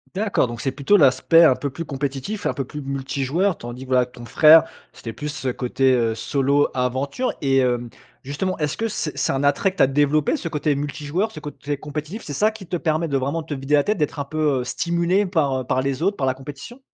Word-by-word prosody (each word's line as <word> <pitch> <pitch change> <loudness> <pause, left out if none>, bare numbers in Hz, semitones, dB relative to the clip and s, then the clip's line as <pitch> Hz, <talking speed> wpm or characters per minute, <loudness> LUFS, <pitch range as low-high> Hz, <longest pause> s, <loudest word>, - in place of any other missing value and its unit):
D'accord. 205 -8 +1
Donc 120 -2 -7
c'est 135 - -1
plutôt 140 +9 +2
l'aspect 165 +3 +5
un 130 -6 +6
peu 140 -2 -4
plus 165 +3 -6
compétitif, 140 +9 -4
un - - +1
peu 135 -3 -3
plus 150 +3 -7
multijoueur, 140 +7 -1
tandis 120 +2 -8
que, - - -12
voilà, 125 -1 +3
ton 120 -1 -12
frère, 155 +7 +7 0.3
c'était 115 -2 -8
plus 150 0 -5
ce 145 -3 -5
côté, 130 +1 +1
heu, 115 -2 +1
solo 140 +5 +1
aventure. 130 - -1
Et 135 -1 +3
hem, 120 -2 0 0.3
justement, 165 +8 -2
est-ce 150 0 -1
que 225 - -1
c'est 165 -8 -4
c'est - - 0
un 135 +1 -1
attrait 145 +7 +2
que 185 - -21
tu - - +5
as - - +5
développé, 145 - +2
ce 165 - -5
côté 150 -1 0
multijoueur, 150 +8 -2
ce 155 - -9
côté 145 -1 -5
compétitif? 155 +8 -6
C'est 145 - -6
ça 215 +10 +2
qui 205 -5 -11
te 175 - -2
permet 160 +1 0
de 140 -2 0
vraiment 140 +5 -2
te 155 -2 -5
vider 135 +2 -3
la 145 -1 +5
tête, 210 - 0
d'être 150 -2 -2
un 140 - -2
peu, 150 -2 0
heu, - - -2
stimulé 170 +8 0
par, 145 -8 0
heu, - - -6
par 130 +1 0
les 135 +2 -2
autres, 200 +2 +1
par 135 -3 0
la 130 - +1
compétition? 145 - -10
145 Hz, 240 wpm, -22 LUFS, 135-165 Hz, 0.3 s, frère